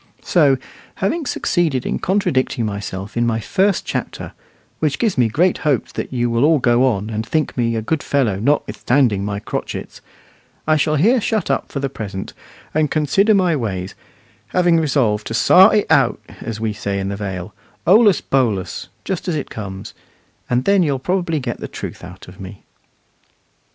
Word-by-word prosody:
So, 145 -6 +3 0.4
having 295 - -1
succeeded 160 - 0
in - - -2
contradicting 175 - 0
myself 100 -1 -5
in 120 0 +1
my 115 -1 0
first 195 - +1
chapter - - -4 0.5
(which 150 -3 0
gives 225 -5 0
me 120 -2 +3
great 170 +11 +1
hopes 140 -7 0
that - - -5
you 120 -2 0
will 115 +1 +1
all 155 +1 +5
go 125 0 +3
on, 105 -3 -1
and 110 0 -2
think 155 +6 -1
me 115 -2 0
a 110 - -2
good 155 +5 -1
fellow 120 -9 0
notwithstanding 125 -3 +1
my 100 0 -3
crotchets), - - -6 0.6
I 155 - +3
shall 155 0 +1
here 225 - +3
shut 215 -3 0
up - - -2
for 140 - -3
the 135 - -1
present, 100 -7 -6 0.4
and 155 -1 +1
consider 195 +9 +3
my 180 -4 +2
ways; 95 -8 -3 0.5
having 175 -2 +3
resolved 130 -9 +1
to 115 - -3
"sar' 190 - +6
it 210 - +2
out," - - +3 0.2
as 110 -2 -5
we 110 -1 -1
say 100 -2 -3
in 95 0 -2
the 100 - -3
Vale, 95 -1 -5 0.3
"holus 205 +2 +5
bolus" 115 -9 -1 0.2
just 190 -2 -3
as 175 - 0
it 145 - -4
comes, 95 -3 -7 0.6
and 125 +1 +1
then 200 -1 +4
you'll 145 -5 +1
probably 175 +2 -1
get 125 -3 -4
the - - -5
truth - - -8
out 90 +1 -11
of 90 +3 -14
me. 95 +1 -10
130 Hz, 175 wpm, -19 LUFS, 105-165 Hz, 0.6 s, sar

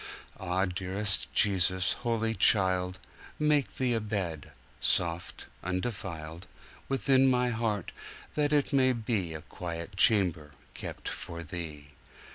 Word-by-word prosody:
Ah! 95 +1 0
dearest 95 +2 +1
Jesus, 95 -1 +3
Holy 115 -2 -1
Child, 90 -4 +3 0.4
Make 150 -2 +1
Thee 125 -2 0
a 115 - +1
bed, 95 -8 -4 0.3
soft, 85 0 +1 0.2
undefiled, 90 -4 -4 0.4
Within 135 +1 +3
my 125 -1 +2
heart, 110 -5 -2 0.4
that 150 -1 +1
it 145 -1 +1
may 130 -1 +4
beA 100 -9 -2
quiet 85 +1 -6
chamber 90 -9 +3 0.2
kept - - -7
for 85 0 -6
Thee. 75 -3 -6
95 Hz, 110 wpm, -29 LUFS, 85-115 Hz, 0.4 s, may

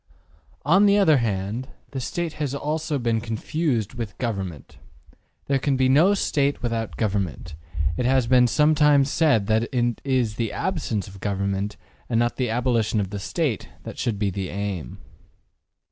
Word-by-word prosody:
``On 190 +7 +5
the 200 0 +5
other 160 -8 +5
hand, 110 +2 -2 0.2
the 135 - -4
STATE 165 +5 -3
has 140 -2 -1
also 150 +1 -2
been 115 -3 0
confused 120 - -2
with 115 -6 -6
GOVERNMENT. 95 - -5
As - - -26 0.3
there 140 -1 +1
can 135 0 0
be 130 0 +3
no 165 +10 +5
State 140 -8 0
without 115 -2 -2
government, 95 -6 -2 0.4
it 125 - 0
has 130 -1 +3
been 125 0 +5
sometimes 150 0 +4
said 145 -11 +3
that 110 +4 +1
it 120 -2 0
is 125 -6 0
the 115 -3 -1
absence 130 - -2
of 95 0 -12
government, 100 +1 -2 0.3
and 115 - +1
not 120 0 0
the 125 -3 0
abolition 115 -2 +1
of 100 -2 -2
the 100 - -4
State, 135 - -2
that - - -8
should 115 -4 -1
be 100 -1 0
the 95 0 -4
aim. 100 -8 -4
120 Hz, 165 wpm, -24 LUFS, 105-140 Hz, 0.4 s, ``On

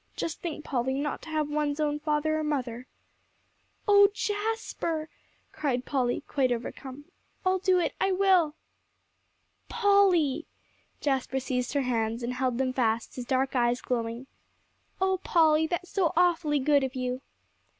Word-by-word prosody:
Just 325 - -4
think, 320 -3 -5
Polly, 265 -1 -1
not 290 +1 -2
to - - -10
have 310 -2 0
one's 295 0 -1
own 295 -1 0
father 305 +1 0
or - - -2
mother." 255 -5 -3 1.0
"Oh 405 -1 +7
Jasper!" 415 -7 -2 0.4
cried 255 -4 -2
Polly, 250 -4 0
quite 265 -3 +1
overcome. 260 +4 -5 0.4
"I'll 370 0 +2
do 370 0 +3
it, 350 - 0
I 385 - +2
will." 370 -5 +3 1.1
"Polly!" 380 - +3 0.5
Jasper 265 -1 0
seized 250 -1 -2
her 285 -2 +1
hands, 230 -1 -1
and 240 +1 -2
held 250 -1 -1
them 260 -1 0
fast, 230 -3 0
his 250 - -5
dark 265 +1 0
eyes 240 0 +2
glowing. 235 0 -3 0.7
"Oh 380 0 +1
Polly, 320 -1 +4
that's 355 +2 -4
so 365 -5 +1
awfully 340 -4 +3
good 285 0 +3
of 265 0 -3
you!" 255 0 -2
290 Hz, 145 wpm, -28 LUFS, 255-335 Hz, 1.1 s, Oh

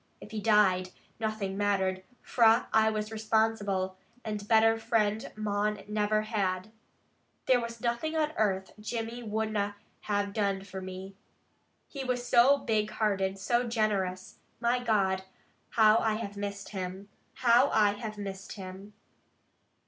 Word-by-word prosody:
If 210 - -12
he 215 -1 -4
died, 195 -4 +3 0.3
nothing 215 -3 -2
mattered, 195 -2 0 0.2
fra 230 0 +4
I 220 0 +5
was 215 0 -3
responsible, 215 -4 0 0.3
and 210 -1 -4
better 225 0 +4
friend 220 -1 0
mon 210 -1 -1
never 210 0 +1
had. 200 -2 -2 0.7
There 255 -2 +4
was 230 -1 -6
nothing 240 +7 -1
on 305 -1 +1
earth 190 - 0
Jimmy 230 +2 -4
would 220 -1 -2
na 205 -1 -1 0.3
have 205 -1 -1
done 200 -2 0
for 190 -1 -7
me. 190 +1 -8 0.7
He 275 -2 -6
was 250 -1 -2
so 260 +4 +6
big 220 -6 0
hearted, 195 -3 0
so 240 +5 0
generous! 200 -5 -1 0.2
My 245 +1 +1
God, 195 -5 +1 0.5
how 220 0 +5
I 220 -1 +1
have 210 -2 -5
missed 200 0 -5
him! 190 0 -5 0.3
How 245 +2 +4
I 210 -2 +4
have 215 0 -6
missed 195 -1 -6
him!" 195 +1 -9
215 Hz, 140 wpm, -29 LUFS, 195-225 Hz, 0.7 s, so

